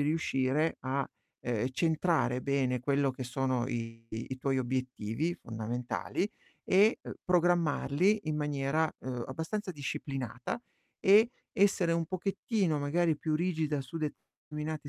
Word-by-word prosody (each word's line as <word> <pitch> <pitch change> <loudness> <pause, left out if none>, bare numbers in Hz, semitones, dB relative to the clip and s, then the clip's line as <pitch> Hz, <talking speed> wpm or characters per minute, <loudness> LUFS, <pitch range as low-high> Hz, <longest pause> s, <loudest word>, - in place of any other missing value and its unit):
riuscire 150 0 +1
a, 135 +1 -1 0.3
ehm, 120 0 0
centrare 160 -4 +2
bene 130 -2 +1
quello 140 +1 +2
che 130 0 -6
sono 125 0 0
i 115 -2 -5
i 120 +4 -5
tuoi 135 0 +1
obiettivi 130 +4 -1
fondamentali 120 - -3 0.3
e, 205 +4 +5
ehm, - - -7
programmarli 175 +1 +3
in 155 - 0
maniera, 150 +1 +1
uhm, 125 -2 -4
abbastanza 185 +8 -3
disciplinata 135 - -4 0.4
e 215 +5 +7 0.2
essere 195 -5 +3
un 165 -1 +1
pochettino, 190 -2 0
magari, 155 +2 +1
più 155 0 0
rigida 155 -4 0
su 150 +5 -6
determinate 150 0 -5
145 Hz, 120 wpm, -31 LUFS, 130-170 Hz, 0.4 s, e